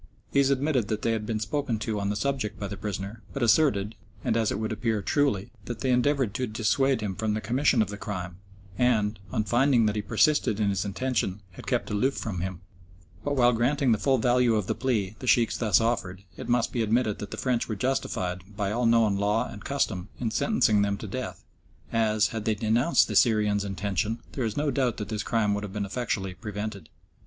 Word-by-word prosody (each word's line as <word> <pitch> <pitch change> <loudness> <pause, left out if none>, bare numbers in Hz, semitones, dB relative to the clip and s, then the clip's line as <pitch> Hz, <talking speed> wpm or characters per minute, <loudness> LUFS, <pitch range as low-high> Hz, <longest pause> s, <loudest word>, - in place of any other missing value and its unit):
These 140 -1 +3
admitted 135 -4 +1
that 110 -1 -3
they 115 - +2
had 110 -1 -2
been 110 -2 -1
spoken 115 +2 -1
to 110 -1 -2
on 100 0 -1
the 105 - -1
subject 125 -4 -2
by 100 - -3
the 100 - -5
prisoner, 100 +2 -5
but 140 - -2
asserted, 110 -4 +3 0.3
and - - +1
as 115 -2 +1
it - - -1
would 110 +1 -2
appear 110 0 0
truly, 135 -9 +1
that 120 -2 -6
they 130 - 0
had 125 - +4
endeavoured 130 -4 +1
to 125 +4 -2
dissuade 115 +4 +1
him 100 -2 -2
from 105 +2 -1
the - - -1
commission 125 0 +2
of 100 - -7
the 105 - -6
crime, 90 -4 -5 0.4
and, 110 -4 +2
on 110 - 0
finding 120 +2 +3
that 105 0 +1
he 105 - 0
persisted 125 -2 +2
in 105 -2 +2
his 95 0 -1
intention, 105 -2 -1
had - - -12
kept - - -1
aloof 130 +7 +1
from 95 -6 -4
him; 95 -2 -4 0.6
but 145 0 -1
while 125 -2 +4
granting 130 +3 +2
the 110 - +2
full 135 -2 +3
value 120 0 +3
of 105 -3 0
the - - 0
plea 110 -5 -1
the 130 - -7
Sheikhs 115 -2 +3
thus 110 -3 +3
offered, 100 -5 -1
it - - -8
must 120 -1 +2
be 120 - 0
admitted 110 -1 +1
that 105 - -6
the 110 - -7
French 120 +2 0
were 110 - -1
justified, 95 -6 -1 0.2
by 100 -2 -1
all 120 +2 +1
known 115 -3 +4
law 105 +3 +1
and 105 - -10
custom, 105 -9 -1
in 115 -3 -1
sentencing 110 - +2
them 100 0 0
to 110 - -7
death, 125 +5 -5 0.5
as, 110 -1 +2
had 110 -2 -5
they 110 - +2
denounced 115 +9 +3
the - - -4
Syrian's 105 -4 +3
intention, 100 +2 -2
there 130 - -2
is 110 - -3
no 145 0 +1
doubt 130 -2 0
but 105 -2 -5
that - - -4
his 105 - -1
crime 110 -3 +1
would 105 0 -2
have 100 -2 -6
been 105 -1 -2
effectually 100 -3 -2
prevented. 105 -2 -6
110 Hz, 225 wpm, -27 LUFS, 105-125 Hz, 0.6 s, had